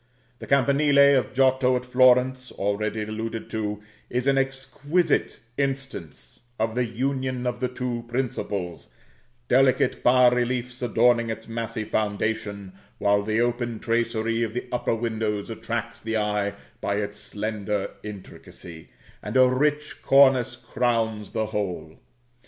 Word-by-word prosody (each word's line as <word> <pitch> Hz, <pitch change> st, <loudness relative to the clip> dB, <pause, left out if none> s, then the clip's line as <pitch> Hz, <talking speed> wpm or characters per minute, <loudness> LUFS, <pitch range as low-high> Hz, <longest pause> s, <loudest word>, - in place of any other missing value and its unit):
The -, -, -9 dB
campanile 140 Hz, +1 st, +5 dB
of 120 Hz, -, -5 dB
Giotto 130 Hz, -1 st, +3 dB
at 125 Hz, 0 st, -2 dB
Florence, 125 Hz, 0 st, +3 dB
already 105 Hz, +2 st, -2 dB
alluded 110 Hz, +1 st, -5 dB
to, 105 Hz, -1 st, -3 dB, 0.3 s
is 125 Hz, +1 st, -1 dB
an 140 Hz, 0 st, +3 dB
exquisite 135 Hz, +5 st, 0 dB, 0.2 s
instance 135 Hz, -, -4 dB, 0.2 s
of 110 Hz, 0 st, -1 dB
the 125 Hz, +1 st, 0 dB
union 130 Hz, +1 st, -2 dB
of 125 Hz, -, -2 dB
the 125 Hz, -, 0 dB
two 125 Hz, -1 st, -4 dB
principles, 115 Hz, -8 st, -3 dB, 0.6 s
delicate 130 Hz, +1 st, +3 dB
bas 125 Hz, 0 st, +5 dB
reliefs 125 Hz, 0 st, -2 dB
adorning 120 Hz, 0 st, +3 dB
its 110 Hz, 0 st, -5 dB
massy 115 Hz, -1 st, -4 dB
foundation, 105 Hz, -2 st, -2 dB, 0.2 s
while 100 Hz, 0 st, +2 dB
the 110 Hz, +2 st, 0 dB
open 120 Hz, -1 st, -1 dB
tracery 115 Hz, -1 st, 0 dB
of 115 Hz, -1 st, -2 dB
the 125 Hz, -, -3 dB
upper 125 Hz, -2 st, 0 dB
windows 110 Hz, -2 st, -2 dB
attracts 115 Hz, +1 st, -4 dB
the 110 Hz, 0 st, -2 dB
eye 105 Hz, -1 st, -1 dB, 0.3 s
by 100 Hz, -, -1 dB
its 105 Hz, 0 st, -3 dB
slender 105 Hz, -1 st, -3 dB
intricacy, 90 Hz, -5 st, -10 dB, 0.3 s
and -, -, -2 dB
a 130 Hz, 0 st, +7 dB
rich 150 Hz, +4 st, 0 dB
cornice 130 Hz, -3 st, +5 dB
crowns 115 Hz, -3 st, -1 dB
the 110 Hz, -, -1 dB
whole. 90 Hz, -7 st, -4 dB
115 Hz, 130 wpm, -25 LUFS, 110-130 Hz, 0.6 s, a